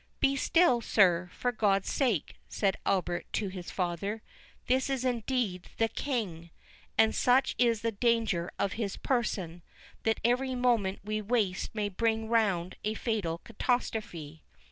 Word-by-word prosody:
"Be 275 - +3
still, 275 -3 +3
sir, 180 -5 +3
for 245 - -1
God's 200 -4 +1
sake!" 235 - 0
said 195 -2 +1
Albert 180 -2 0
to 205 -3 -1
his 185 -2 -7
father. 195 +4 -2 0.4
"This 260 +2 +1
is 265 -2 -1
indeed 235 -6 -1
THE 225 0 +2
KING; 200 - -3 0.5
and 220 0 +5
such 260 +2 +3
is 230 -3 +3
the 230 - +1
danger 225 -5 +1
of 200 0 0
his 210 -4 -3
person, 190 -9 -1 0.4
that 225 0 +1
every 255 +2 +1
moment 235 -6 +1
we 215 +1 -2
waste 210 -3 -1
may 210 -2 0
bring 220 +2 0
round 195 -7 +1
a 215 +1 -1
fatal 205 -10 -1
catastrophe." 185 - -2
220 Hz, 145 wpm, -30 LUFS, 190-240 Hz, 0.5 s, and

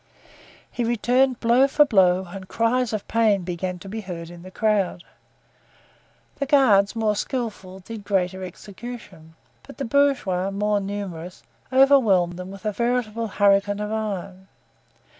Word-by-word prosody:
He 245 - -2
returned 245 +2 +1
blow 240 +4 +4
for 295 +2 +4
blow 190 -6 +3
and 185 +2 -9
cries 230 +3 0
of 215 -2 -4
pain 215 -4 +2
began 180 +1 -4
to 185 - -12
be 220 +3 -5
heard 170 -4 -7
in 175 -1 -12
the 185 - -11
crowd. 200 -3 0 1.3
The 280 - -2
guards, 235 -8 +4
more 220 -2 +1
skillful, 205 -6 -4
did 220 +2 -9
greater 190 -2 -1
execution; 190 -3 -10 0.3
but 275 - -14
the 275 - -3
bourgeois, 230 -9 +1
more 205 +1 0
numerous, 195 -3 -6 0.3
overwhelmed 230 -11 +4
them 180 0 -7
with 195 +2 -11
a 215 - +1
veritable 235 0 -1
hurricane 205 0 +2
of 210 0 -3
iron. 195 -3 -4
205 Hz, 140 wpm, -23 LUFS, 185-235 Hz, 1.3 s, blow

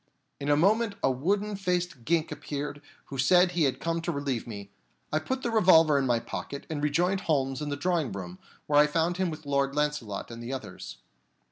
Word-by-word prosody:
In 140 - -3
a 145 - +5
moment 205 +5 +3
a 135 - +4
wooden 200 +10 0
faced 180 -8 -2
gink 165 -1 +1
appeared, 145 0 -5 0.3
who 135 - -5
said 180 +6 +5
he 170 -3 +2
had 130 -2 0
come 165 0 -1
to 170 +1 -2
relieve 140 -6 -3
me. 100 -3 -8 0.4
I 155 - +3
put 260 +11 -3
the 235 - -1
revolver 165 -9 +6
in 135 - 0
my 120 -2 +2
pocket 140 +4 -6
and 150 -2 -2
rejoined 175 +6 +1
Holmes 135 -5 0
in 150 - -3
the 145 - -1
drawing 170 -4 0
room, 95 -2 -7 0.3
where 145 0 +4
I 150 - +6
found 165 +3 0
him 185 -1 0
with 155 -1 -8
Lord 140 0 0
Launcelot 150 -9 -2
and 115 0 -8
the 120 +3 -5
others. 105 -8 -7
150 Hz, 210 wpm, -28 LUFS, 135-175 Hz, 0.4 s, revolver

